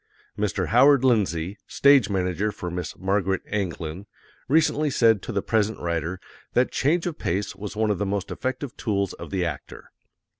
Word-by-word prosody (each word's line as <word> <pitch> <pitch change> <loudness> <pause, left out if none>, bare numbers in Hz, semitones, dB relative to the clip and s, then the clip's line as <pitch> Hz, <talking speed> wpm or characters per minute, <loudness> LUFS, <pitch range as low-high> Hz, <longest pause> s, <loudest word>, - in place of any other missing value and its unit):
Mr. 105 -3 -1
Howard 135 +3 +6
Lindsay, 100 -6 +1
Stage 140 -6 +4
Manager 95 +2 0
for 90 -3 -6
Miss 90 -3 -5
Margaret 95 0 0
Anglin, 90 -2 -4 0.4
recently 155 0 +2
said 115 -6 +3
to - - -6
the 100 -3 -1
present 110 -1 0
writer 85 +1 -2 0.3
that 125 +1 +2
change 165 +5 +1
of 170 -3 -4
pace 95 +3 -2
was 105 +1 -7
one 110 0 +1
of 100 - -2
the - - 0
most 100 -1 -2
effective 130 0 -4
tools 100 -4 -1
of - - -9
the 95 -2 -1
actor. 75 -5 -7
100 Hz, 165 wpm, -24 LUFS, 90-120 Hz, 0.4 s, Howard